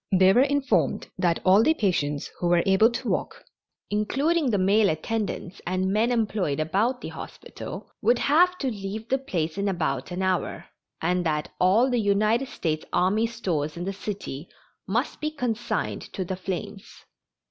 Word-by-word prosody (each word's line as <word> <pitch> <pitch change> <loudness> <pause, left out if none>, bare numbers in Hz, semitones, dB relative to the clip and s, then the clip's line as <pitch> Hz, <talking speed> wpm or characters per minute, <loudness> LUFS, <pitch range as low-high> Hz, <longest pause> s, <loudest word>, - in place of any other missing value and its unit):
They 190 0 +6
were 245 - +5
informed 280 -1 +1
that 170 -3 +1
all 190 +3 +6
the 315 +8 +3
patients 150 - -1
who 175 - 0
were 175 0 +4
able 195 +4 +5
to 235 - -5
walk, - - -2 0.5
including 275 +9 +1
the 210 - +2
male 200 +2 +4
attendants 195 +3 -3
and 185 +1 0
men 225 +4 +2
employed 210 - 0
about 205 +11 0
the - - -5
hospital, - - -9
would 235 +3 +4
have 355 +8 +3
to 270 -6 -1
leave 210 +2 -6
the 265 - +2
place 175 - -3
in 200 - 0
about 140 -8 -2
an 180 +1 -3
hour, 185 -1 -1 0.4
and 180 +2 +1
that 150 -1 -1
all 200 +8 +4
the 245 -2 +1
United 215 +5 +2
States 155 -10 -2
army 200 +6 +2
stores 170 -10 -2
in 175 - -4
the 195 - -2
city 190 -7 -6 0.4
must 235 +10 -1
be 305 - 0
consigned 245 -6 -2
to 190 - -3
the 185 - -3
flames. 195 +3 -6
200 Hz, 170 wpm, -25 LUFS, 180-235 Hz, 0.5 s, They